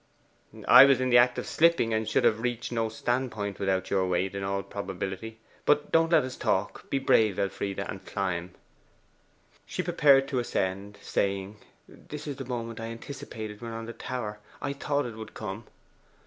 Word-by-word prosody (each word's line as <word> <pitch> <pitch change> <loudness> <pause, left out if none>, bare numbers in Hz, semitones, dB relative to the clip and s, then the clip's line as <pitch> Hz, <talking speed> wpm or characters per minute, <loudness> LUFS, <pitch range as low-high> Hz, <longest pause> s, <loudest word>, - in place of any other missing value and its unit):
'I 125 +2 +10
was 135 -2 +4
in 130 0 0
the 120 - +8
act 125 0 +4
of - - -3
slipping, 165 -9 +3
and 110 0 0
should - - +2
have 115 -2 +3
reached 120 0 -2
no 115 -2 0
stand 120 +3 -1
point 100 -2 -4
without 95 -1 0
your 95 -2 +2
weight, 90 +2 0
in 100 0 -4
all 100 0 -1
probability. 95 +2 -5 0.3
But 150 0 +2
don't 165 0 +3
let 165 - +5
us 130 0 -5
talk. 95 +2 -1
Be 140 - +1
brave, 110 -7 +3
Elfride, 100 0 -2
and - - -5
climb.' 90 -2 -3 1.1
She - - -3
prepared 135 -2 +4
to 130 - 0
ascend, 100 -3 -2
saying, 100 +1 -1 0.3
'This 150 0 -10
is 145 -3 -5
the 135 - -6
moment 115 -2 -4
I 115 - -4
anticipated 115 -3 -7
when 115 -1 -6
on 115 0 -5
the 115 - -7
tower. 110 -5 -5 0.2
I 140 -1 -3
thought 145 0 -1
it 120 -2 -6
would 110 - -9
come! 105 +1 -6
115 Hz, 185 wpm, -28 LUFS, 100-130 Hz, 1.1 s, I